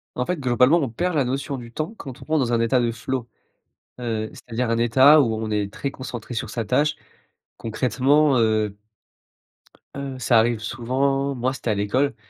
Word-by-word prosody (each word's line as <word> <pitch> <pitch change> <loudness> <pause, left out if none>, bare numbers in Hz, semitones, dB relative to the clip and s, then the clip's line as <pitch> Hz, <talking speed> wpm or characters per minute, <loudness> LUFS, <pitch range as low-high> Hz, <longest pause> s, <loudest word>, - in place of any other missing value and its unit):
En 125 - -2
fait, 180 - -1
globalement, 130 +4 +3
on 140 -7 -1
perd 175 +10 -2
la 140 - +3
notion 135 +3 -3
du 120 -2 -10
temps 155 - -4
quand 135 - -9
on - - -10
rentre 155 -1 +1
dans 120 -2 0
un 115 - +2
état 115 +2 +2
de 120 -1 0
flow, 120 +2 -4 0.7
heu, 110 -3 -2
c'est-à-dire, 120 0 -4
un 115 - +1
état 130 +6 +6
où 115 -5 +1
on 110 0 -4
est 105 -1 -1
très 140 +4 -4
concentré 125 -3 -7
sur 115 -1 -3
sa 115 0 -3
tâche, 150 +7 +1 0.6
concrètement, 135 +5 +2
heu 110 -2 +1 1.2
heu, 135 -2 -5
ça 120 -1 +3
arrive 115 0 +2
souvent. 135 +4 -1
Moi, 125 +1 -1
c'était 130 -3 -4
à - - +2
l'école, 115 +8 0
125 Hz, 190 wpm, -23 LUFS, 115-140 Hz, 1.2 s, état